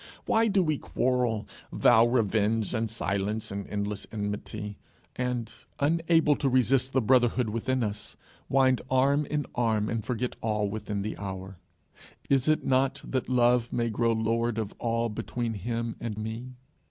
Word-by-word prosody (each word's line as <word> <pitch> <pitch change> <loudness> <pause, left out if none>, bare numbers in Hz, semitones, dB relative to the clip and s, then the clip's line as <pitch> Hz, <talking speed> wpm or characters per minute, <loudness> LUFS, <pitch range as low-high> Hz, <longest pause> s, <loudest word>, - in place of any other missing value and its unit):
Why 225 0 +3
do 200 -3 +3
we 155 -3 0
quarrel, 120 -4 0 0.2
vow 115 +1 +5
revenge 110 -2 +1
and 115 -1 -1
silence 105 0 -2
and 100 0 -5
endless 100 0 -3
enmity, 105 0 -5 0.4
and, 125 -3 -2 0.3
unable 165 0 +3
to 135 - +1
resist 130 +1 +3
the 130 - +3
brotherhood 120 -1 +3
within 120 +3 -1
us, 105 0 -5 0.3
wind 130 -1 +3
arm 140 +3 +3
in 150 -1 -1
arm 110 -3 +1
and 115 -1 -2
forget 125 +1 -2
all 105 -2 0
within 105 -1 -3
the 110 - -4
hour? 95 -1 -6 0.7
Is 135 0 +3
it 155 0 +2
not 130 +1 +1
that 130 -1 -2
Love 120 -1 +3
may 115 -1 0
grow 115 +2 +1
lord 115 +1 0
of 110 -2 -3
all 115 0 0
between 115 +1 -3
him 115 +3 -3
and 110 -3 -4
me? 115 +4 -5
115 Hz, 155 wpm, -28 LUFS, 105-130 Hz, 0.7 s, vow